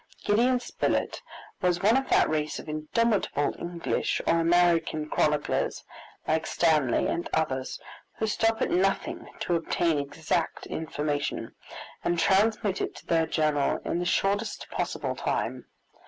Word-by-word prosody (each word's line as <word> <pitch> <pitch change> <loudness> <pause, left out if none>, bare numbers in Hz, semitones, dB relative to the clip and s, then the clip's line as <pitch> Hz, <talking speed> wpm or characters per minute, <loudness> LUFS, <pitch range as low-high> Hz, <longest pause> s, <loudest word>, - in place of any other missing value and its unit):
Gideon 245 +5 +3
Spilett 245 - -1 0.4
was 180 -1 +1
one 220 +4 +5
of 270 0 0
that - - +4
race 155 -1 -1
of - - -9
indomitable 155 0 0
English 170 -1 -1
or 165 - +3
American 165 -2 +2
chroniclers, 150 -1 0 0.4
like 160 0 +1
Stanley 150 -7 +2
and 170 - -2
others, 135 -5 -1 0.4
who 220 - 0
stop 225 +1 +1
at - - -1
nothing 195 +2 0
to 175 - +1
obtain 165 -1 +1
exact 160 +3 -2
information, 150 -2 -3 0.5
and 175 - +1
transmit 200 +2 +2
it - - -3
to - - -12
their 165 -1 +2
journal 150 -3 +1
in 170 - -1
the 175 - -2
shortest 200 +4 0
possible - - -2
time. - - -2
170 Hz, 135 wpm, -27 LUFS, 155-195 Hz, 0.5 s, one